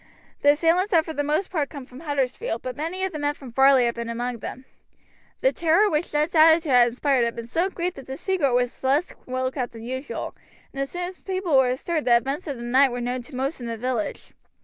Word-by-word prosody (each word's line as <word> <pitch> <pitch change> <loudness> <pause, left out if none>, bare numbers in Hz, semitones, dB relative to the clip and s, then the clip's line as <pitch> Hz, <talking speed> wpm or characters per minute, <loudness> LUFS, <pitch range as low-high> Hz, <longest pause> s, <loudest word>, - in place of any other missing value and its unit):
The 290 0 +6
assailants 345 +6 +2
had 325 -2 +4
for 320 - -5
the 290 - -1
most 305 +6 -1
part 305 -6 -1
come 285 -3 -8
over - - -18
from 255 - -11
Huddersfield, 270 -6 -2
but 255 -1 -4
many 335 +6 -3
of 380 - -1
the 305 - -5
men 290 0 0
from 265 -4 -11
Varley 265 0 +5
had 235 - +1
been 235 0 -5
among 240 +1 -3
them. 260 +5 -7 0.8
The - - +4
terror 345 +5 +3
which 305 +3 -1
Ned's 300 +3 0
attitude 320 -1 +5
had 245 -1 +6
inspired 255 +1 +1
had 235 0 -1
been 235 -1 -6
so 335 +10 0
great 360 -1 -3
that 270 - -11
the 265 0 -5
secret 310 -10 +1
was 245 +1 -1
less 280 +6 +1
well 255 0 -1
kept 250 -3 -4
than 225 -1 -10
usual, 260 +4 -5 0.4
and 275 - -3
as 275 - -2
soon 355 0 -4
as 365 +1 -6
people 370 -5 -1
were 265 -1 +5
astir 310 +6 -1
the 240 -4 +5
events 275 +8 -3
of 280 -3 -4
the 235 - -7
night 260 +3 +4
were 245 - -3
known 245 +1 -2
to 255 +3 -11
most 270 +4 -2
in 240 - -6
the 230 -1 -4
village. 245 -2 -3
275 Hz, 250 wpm, -24 LUFS, 250-325 Hz, 0.8 s, The